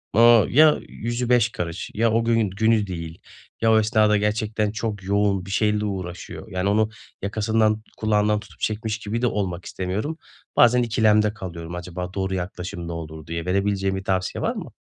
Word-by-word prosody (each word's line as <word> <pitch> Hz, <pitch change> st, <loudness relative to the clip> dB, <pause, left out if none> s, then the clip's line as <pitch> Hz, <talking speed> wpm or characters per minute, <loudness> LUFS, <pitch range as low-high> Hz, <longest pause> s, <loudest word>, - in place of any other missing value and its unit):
ııı, 115 Hz, -1 st, +6 dB
ya 155 Hz, +3 st, +6 dB
yüzü 120 Hz, +1 st, -3 dB
beş 120 Hz, -1 st, +4 dB
karış 85 Hz, -5 st, -5 dB
ya 115 Hz, +1 st, +2 dB
o 115 Hz, +1 st, +2 dB
gün 115 Hz, -3 st, +2 dB
günü 110 Hz, +1 st, +2 dB
değil 85 Hz, -2 st, -6 dB, 0.4 s
ya 115 Hz, 0 st, +4 dB
o 110 Hz, -, +6 dB
esnada 110 Hz, -1 st, +3 dB
gerçekten 105 Hz, 0 st, 0 dB
çok 105 Hz, -2 st, -4 dB
yoğun 100 Hz, -1 st, +1 dB
bir 95 Hz, -, -7 dB
şeyle 105 Hz, +1 st, +1 dB
uğraşıyor; 95 Hz, -3 st, -6 dB
yani, 95 Hz, +1 st, 0 dB
onu 110 Hz, +1 st, +2 dB, 0.3 s
yakasından, 110 Hz, +1 st, +1 dB
kulağından 105 Hz, -1 st, +2 dB
tutup -, -, -16 dB
çekmiş 110 Hz, 0 st, -2 dB
gibi 110 Hz, +3 st, -3 dB
de 125 Hz, -, +3 dB
olmak 95 Hz, -5 st, -2 dB
istemiyorum. 100 Hz, -, -3 dB, 0.4 s
Bazen 120 Hz, +1 st, +5 dB
ikilemde 105 Hz, -2 st, +3 dB
kalıyorum, 85 Hz, -5 st, -7 dB
acaba 90 Hz, +1 st, -6 dB
doğru 95 Hz, -1 st, -2 dB
yaklaşım 90 Hz, -1 st, -5 dB
ne -, -, -5 dB
olur 80 Hz, -2 st, -7 dB
diye. 85 Hz, 0 st, -4 dB
Verebileceğin 95 Hz, +1 st, 0 dB
bir 95 Hz, -, -4 dB
tavsiye 95 Hz, -1 st, -1 dB
var -, -, 0 dB
mı? -, -, -7 dB
105 Hz, 175 wpm, -23 LUFS, 95-110 Hz, 0.4 s, ııı